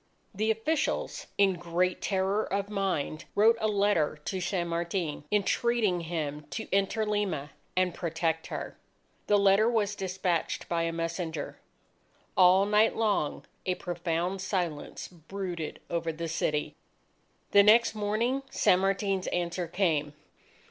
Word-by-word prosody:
The 215 +3 0
officials, 250 +8 -1
in 200 -1 +4
great 175 +1 0
terror 195 +2 +1
of 200 +1 -1
mind, 190 -7 -2
wrote 220 +3 +6
a 215 - +2
letter 200 -7 +2
to 190 -2 -2
San 175 -1 -1
Martin, 170 -3 -2
entreating 210 -1 +2
him 150 -3 -4
to 220 - -5
enter 200 +3 +1
Lima 200 -9 -1 0.3
and 185 -1 +2
protect 165 -1 -2
her. - - -5 0.5
The 205 - +5
letter 200 +3 +5
was 210 -4 +1
despatched 185 -3 -2
by 170 -1 0
a 165 - -1
messenger. 165 -2 -4 0.8
All 185 +2 +6
night 210 +2 +3
long, 205 -10 0 0.2
a 185 - +1
profound 175 +2 -2
silence 175 -6 -3
brooded 175 -1 -6
over 170 -1 -1
the 165 +1 -5
city. 150 -2 -1 0.8
The 200 - +8
next 220 +3 +6
morning 220 +5 0
San 180 - +3
Martin's 195 0 0
answer 175 0 -2
came. 160 -5 0
185 Hz, 130 wpm, -29 LUFS, 170-205 Hz, 0.8 s, The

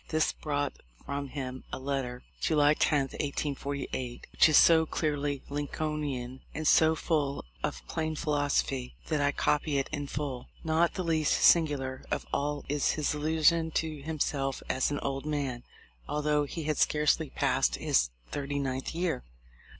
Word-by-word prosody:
This 155 0 +2
brought 145 -2 -2 0.3
from 140 0 -3
him 130 -2 -5
a - - -3
letter, 130 -2 -3 0.2
July 150 -2 +4
10, 150 -1 +2
1848, 140 -3 -3
which - - +5
is 155 - +6
so 160 -1 +6
clearly 145 -3 -1
Lincolnian 145 -3 -3
and 155 0 -1
so 160 0 +6
full 150 - -1 0.2
of 65 -2 -3
plain 155 0 -2
philosophy, 145 -4 0
that 155 -3 +1
I 145 0 +3
copy 150 +1 +1
it 135 - 0
in 145 -2 -3
full. 135 -4 -4 0.2
Not 160 +1 +2
the 185 - -2
least 160 -3 +2
singular 140 -6 +3
of - - -2
all 145 +1 -1
is 145 0 +1
his 150 -2 0
illusion 160 +2 +3
to 155 -3 -1
himself 140 -3 -2
as 130 - +1
an 145 - -1
old 135 +1 -3
man, 140 -5 -2 0.5
although 150 0 +1
he 160 +3 -5
had 150 -1 -1
scarcely 150 0 +2
passed - - +1
his 60 -1 +2 0.2
thirty 145 0 -3
ninth 135 +1 -2
year. 175 - -1
145 Hz, 150 wpm, -30 LUFS, 135-155 Hz, 0.5 s, is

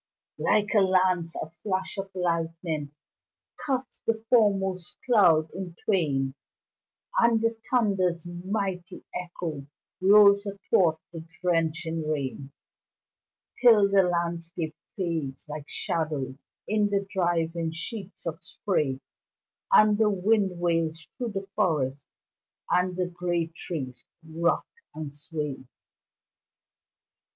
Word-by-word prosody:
Like 210 +1 +2
a 215 - +6
lance, 185 -3 +2
a - - -4
flash 185 +3 -3
of 195 0 -4
lightning 165 -4 -2 0.7
Cuts 260 -2 -2
the 230 - +3
foremost 200 -6 +1
cloud 170 -10 +5
in 180 -2 -6
twain 140 -10 +1 0.9
And 235 -1 +4
the 230 0 +1
thunder's 190 -8 +1
mighty 180 +1 -4
echo 170 -5 -5 0.3
Rolls 200 +1 +7
athwart 185 -4 +2 0.2
the 165 -1 -6 0.2
drenching 165 -2 0
rain 140 -2 -3 1.1
Till 215 -5 +6
the 200 -1 +6
landscape 170 -2 -2 0.2
fades 165 -7 -3
like 150 -1 -7
shadows 150 -5 -2 0.3
In 210 -1 +2
the 200 -1 0
driving 170 -3 0
sheets 195 +4 -7
of 165 -2 -4
spray, 150 -10 -1 0.7
And 215 0 +6
the 220 -1 +5
wind 195 -2 +1
wails 165 -2 0
through 240 -5 -4
the 195 -1 -3
forest, 145 -9 0 0.6
And 180 0 +2
the 180 - +1
great 175 -1 -2
trees 140 -8 -6 0.2
rock 165 +2 +1 0.3
and 155 -3 -6
sway. 150 -2 -5
175 Hz, 105 wpm, -27 LUFS, 160-200 Hz, 1.1 s, Rolls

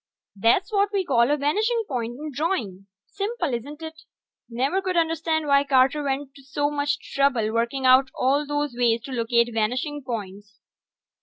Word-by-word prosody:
That's 230 - +2
what 405 -1 +2
we 390 -3 0
call 240 -4 +3
a 295 - +2
vanishing 430 - +1
point 240 -2 -3
in 305 +1 -6
drawing. 235 - -2 0.2
Simple, 395 - -3
isn't 290 +7 -6
it? 315 0 -8 0.5
Never 270 +11 0
could 370 -2 -2
understand 325 -1 0
why 280 -1 +4
Carter 270 +1 +3
went 275 -1 -3
to 275 - -16
so 290 +2 -1
much 285 0 -2
trouble 250 -6 +1
working 235 +4 -1
out 260 +1 +6
all 280 +3 +1
those 290 -2 -2
ways 235 -2 +2
to 270 - -9
locate 235 -1 +1
vanishing 250 +7 -1
points. 205 -3 -7
275 Hz, 165 wpm, -24 LUFS, 235-305 Hz, 0.5 s, out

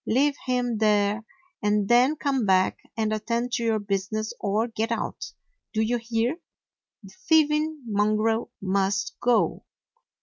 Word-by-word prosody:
Leave 280 +5 +3
him 245 -3 0
there, 210 0 +2 0.4
and 210 -1 +1
then 250 +6 +4
come 275 -4 0
back 190 -2 +3 0.2
and 215 -1 0
attend 235 +3 -2
to 235 - -1
your 225 -1 +2
business 205 +1 -2
or 210 +3 0
get 225 0 -3
out. 230 - -3 0.5
Do 220 - +2
you 240 +2 +1
hear? 230 +5 -1 0.7
The 195 - -13 0.2
thieving 305 -1 +3
mon 210 -1 +1
grel 225 +2 0
must 195 0 0
go. 245 -1 +2
225 Hz, 140 wpm, -25 LUFS, 210-245 Hz, 0.7 s, then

